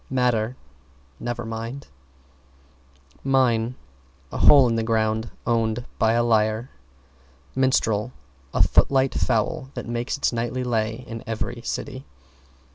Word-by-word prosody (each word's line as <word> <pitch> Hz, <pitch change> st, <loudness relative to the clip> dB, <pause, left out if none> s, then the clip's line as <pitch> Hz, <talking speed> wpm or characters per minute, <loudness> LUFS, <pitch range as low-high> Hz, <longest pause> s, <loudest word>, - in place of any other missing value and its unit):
=MATTER= 125 Hz, -2 st, +1 dB, 0.6 s
Never 120 Hz, -1 st, -4 dB
mind. 115 Hz, +4 st, -5 dB, 1.4 s
=MINE= 125 Hz, -3 st, +2 dB, 0.6 s
A -, -, -4 dB
hole 140 Hz, -3 st, +8 dB
in 115 Hz, -, +1 dB
the 115 Hz, -, +1 dB
ground 110 Hz, 0 st, 0 dB, 0.2 s
owned 115 Hz, 0 st, 0 dB
by 110 Hz, 0 st, +3 dB
a 120 Hz, 0 st, +3 dB
liar. 110 Hz, +1 st, +1 dB, 0.8 s
=MINSTREL= 125 Hz, -4 st, +1 dB, 0.4 s
A -, -, +3 dB
footlight 135 Hz, -1 st, +3 dB
foul 130 Hz, -, 0 dB
that -, -, -5 dB
makes 120 Hz, +3 st, -2 dB
its 140 Hz, -, 0 dB
nightly 120 Hz, +2 st, -2 dB
lay 115 Hz, 0 st, -1 dB
in 115 Hz, -2 st, -7 dB
every 115 Hz, -1 st, -3 dB
city. 70 Hz, -, -5 dB
115 Hz, 120 wpm, -24 LUFS, 110-125 Hz, 1.4 s, hole